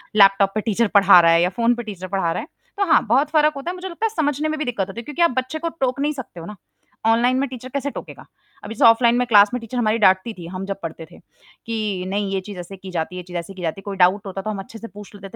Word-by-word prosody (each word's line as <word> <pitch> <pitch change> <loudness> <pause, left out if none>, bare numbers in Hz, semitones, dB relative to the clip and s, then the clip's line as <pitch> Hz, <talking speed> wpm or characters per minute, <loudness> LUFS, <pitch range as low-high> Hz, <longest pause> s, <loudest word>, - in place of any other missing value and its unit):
Laptop 195 -1 +5
पे 215 - 0
teacher 225 +1 +1
पढ़ा 195 -2 +7
रहा 170 -1 +5
है 165 - +4
या 180 - +2
फ़ोन 235 +1 +3
पे 240 - -6
टीचर 195 -4 -7
पढ़ा 190 -3 -1
रहा - - -2
है। - - -10 0.3
तो 400 - +1
हाँ, 320 - +3
बहुत 260 +7 +2
फ़र्क 305 -1 +3
होता 275 +4 -5
है, - - -7
मुझे 370 +1 -7
लगता 345 +6 -3
है - - +2
समझने 300 -1 0
में 310 - -2
भी 305 - -2
दिक्कत 225 -7 -2
होती 195 +4 -8
है - - -7
क्योंकि 295 +6 -5
आप 340 - +5
बच्चे 260 +5 -2
को 335 +1 -2
टोक 255 +1 0
नहीं 295 +1 0
सकते 255 -10 -9
हो 165 - -8
ना, 210 - -8 0.5
ऑनलाइन 235 +3 +3
में 275 - 0
टीचर 255 0 -9
कैसे 280 +1 -3
टोकेगा? - - -9 0.4
अभी 225 - -7
जैसे - - +3
ऑफ़लाइन 235 +1 +5
में 250 - +1
क्लास 205 -3 +6
में 250 - -1
टीचर 230 +2 -6
हमारी 225 -2 +1
डाँटती 190 +3 +3
थी, 175 -4 -10
हम 185 +2 -6
जब 195 0 -5
पढ़ते 165 0 -6
थे - - -15 0.5
कि 215 -5 -3
नहीं 200 +1 -2
ये 195 - 0
चीज़ 195 -1 -9
ऐसे 180 +2 -8
की 190 0 -10
जाती 170 +1 -3
है, - - -5
ये - - -7
चीज़ 180 -1 -5
ऐसे 170 +3 -6
की 185 - -10
जाती 170 +3 -3
है, - - -27
कोई 200 -1 -5
डाउट 190 +3 +3
होता 195 0 -5
तो 215 - -5
हम 205 - -4
अच्छे 210 +3 -10
से 230 - -8
पूछ 210 -1 -13
लेते 195 -1 -10
215 Hz, 310 wpm, -21 LUFS, 190-255 Hz, 0.5 s, पढ़ा